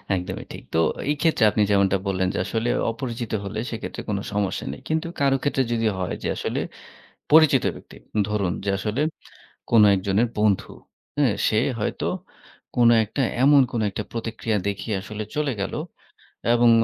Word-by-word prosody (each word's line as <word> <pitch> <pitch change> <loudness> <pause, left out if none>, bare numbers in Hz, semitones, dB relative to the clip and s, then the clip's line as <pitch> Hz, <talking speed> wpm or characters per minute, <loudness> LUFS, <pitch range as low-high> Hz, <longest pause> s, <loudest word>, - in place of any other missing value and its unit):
একদমই 90 0 -4
ঠিক, - - -9
তো - - +2 0.3
এইক্ষেত্রে 150 -4 +2
আপনি 105 - +1
যেমনটা 100 -1 +3
বললেন 95 -1 +1
যে - - -3
আসলে 115 +1 -1 0.2
অপরিচিত 120 -1 -5
হলে 105 +2 -4
সেক্ষেত্রে 115 - -5
কোন 100 - 0 0.2
সমস্যা 100 -2 -1
নেই। - - -10
কিন্তু 160 +1 0
কারো 140 -1 +3
ক্ষেত্রে 135 -2 +1
যদি 115 -1 +1
হয় 90 - -2
যে, - - -1
আসলে - - -2 0.7
পরিচিত 155 -5 +6
ব্যক্তি - - -13 0.3
ধরুন 100 -5 0
যে - - 0
আসলে 110 +7 -2 0.7
কোন 115 -2 +6
একজনের 100 +5 +1
বন্ধু, 105 -2 +2 0.5
হ্যাঁ 135 -8 +3
সে 110 - +3 0.2
হয়তো 105 - -2 0.7
কোনো 120 -1 +6
একটা 135 - -3 0.2
এমন 140 0 +7
কোনো 115 -2 -1
একটা - - -4
প্রতিক্রিয়া 115 -1 -2
দেখিয়ে 100 +1 -2
আসলে 105 +1 -6
চলে 150 -3 0
গেল - - -4 0.8
এবং 120 0 +5
110 Hz, 155 wpm, -24 LUFS, 100-130 Hz, 0.8 s, এমন